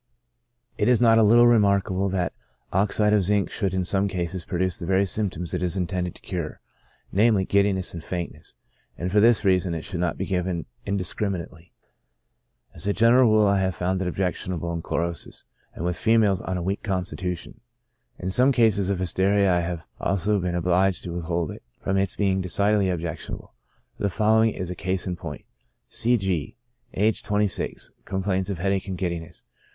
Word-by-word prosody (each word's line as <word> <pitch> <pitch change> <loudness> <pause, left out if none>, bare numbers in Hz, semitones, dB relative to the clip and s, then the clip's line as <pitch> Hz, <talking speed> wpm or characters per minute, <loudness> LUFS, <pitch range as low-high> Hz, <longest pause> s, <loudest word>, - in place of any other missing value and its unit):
It 105 - +2
is 125 -2 +4
not 115 -2 +5
a - - +6
little 115 +3 +6
remarkable 100 -4 +3
that 90 -4 -1 0.4
oxide 105 +2 +2
of 105 - +4
zinc 100 +1 +1
should 100 -4 -1
in 95 0 -1
some 100 +2 +1
cases 90 -2 -3
produce 90 -1 -1
the 85 - -5
very 95 +1 +3
symptoms 90 -4 -2
it 90 - -1
is 90 +1 -1
intended 90 -1 -2
to - - -17
cure, 85 -5 -5 0.5
namely, 105 -1 +3
giddiness 100 -2 +1
and 85 -2 -7
faintness; 90 -2 -6 0.4
and 90 +1 -3
for 105 - +4
this 110 -1 +5
reason 90 -2 +2
it 80 - -5
should 90 - -5
not 90 -1 -1
be 95 - -2
given 90 -3 -2 0.2
indiscriminately. 90 -3 -2 1.0
As 100 - -6
a 100 - +2
general 115 +3 +5
rule 110 -1 +4
I 100 -1 +3
have 95 -2 0
found 95 +2 -1
it 95 - -1
objectionable 90 -2 -2
in 85 - -3
chlorosis, 85 +1 -3 0.3
and 85 - -4
with 90 0 0
females 110 -4 +3
of 95 -1 -3
a 90 - -3
weak 95 +3 -2
constitution. 90 -3 -3 0.6
In 95 - -4
some 125 +7 +4
cases 110 -6 +3
of 100 - 0
hysteria 95 +2 +2
I 90 - +2
have 85 -2 -4
also 100 +3 +1
been 90 -1 -2
obliged 90 +2 +1
to 90 - -5
withhold 85 -1 -2
it, - - -10 0.2
from 95 - -1
its 95 -1 +1
being 95 -2 +1
decidedly 100 +2 +2
objectionable; 85 -2 -5 0.5
the 100 - 0
following 110 +4 +3
is 90 -4 -5
a - - -5
case 95 0 -2
in 90 -2 -2
point. 85 -5 -8 0.4
C. 120 +1 +2
G 95 - -2 0.2
—, - - -40
aged 105 +3 +1
26, 105 -1 -1
complains 95 0 -1
of 100 - -3
headache 95 +2 -1
and 95 -2 -4
giddiness. 85 -2 -4
95 Hz, 180 wpm, -24 LUFS, 90-100 Hz, 1.0 s, a